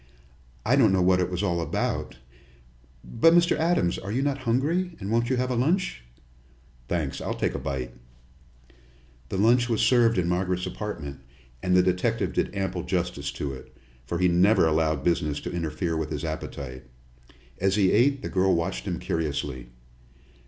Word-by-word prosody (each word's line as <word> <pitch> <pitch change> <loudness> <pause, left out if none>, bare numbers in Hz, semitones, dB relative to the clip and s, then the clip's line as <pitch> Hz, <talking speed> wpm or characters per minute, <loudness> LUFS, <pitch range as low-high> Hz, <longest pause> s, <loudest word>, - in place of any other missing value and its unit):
I 120 +5 +4
don't 120 -8 +5
know 95 -1 +3
what 90 0 +4
it 90 - 0
was 90 +2 -3
all 85 -4 0
about. 80 - -2 0.9
But, 165 +9 +4
Mr. 175 0 +4
Adams, 160 - +1
are 100 +2 -6
you 130 +5 0
not 140 -1 -1
hungry, 165 +9 0
and 100 - -5
won't 115 +1 +1
you 130 - +1
have 125 +1 0
a - - 0
lunch?" 165 - 0 0.9
"Thanks, 80 -6 -2
I'll - - -3
take - - -1
a - - -3
bite." 65 -3 -4 1.4
The - - -3
lunch 120 +4 +3
was 115 - +1
served 115 -3 +4
in 90 -2 +1
Margaret's 90 +1 0
apartment, 75 -10 -6 0.4
and 90 0 +2
the 90 - +5
detective 95 +6 0
did - - -1
ample 95 -2 -2
justice 90 -5 -2
to 70 -2 -4
it, 65 - -12 0.3
for 85 - -2
he 90 +1 +3
never 90 +3 +4
allowed 80 -2 +1
business 75 -4 0
to - - -5
interfere 80 0 -2
with 80 -1 -2
his 75 0 -4
appetite. 70 -4 -6 0.8
As 95 +1 +2
he 100 -3 +3
ate, 135 +5 +3
the - - -2
girl 95 0 +2
watched 85 +4 -2
him 90 -4 -2
curiously. 70 -7 -3
90 Hz, 175 wpm, -26 LUFS, 80-115 Hz, 1.4 s, don't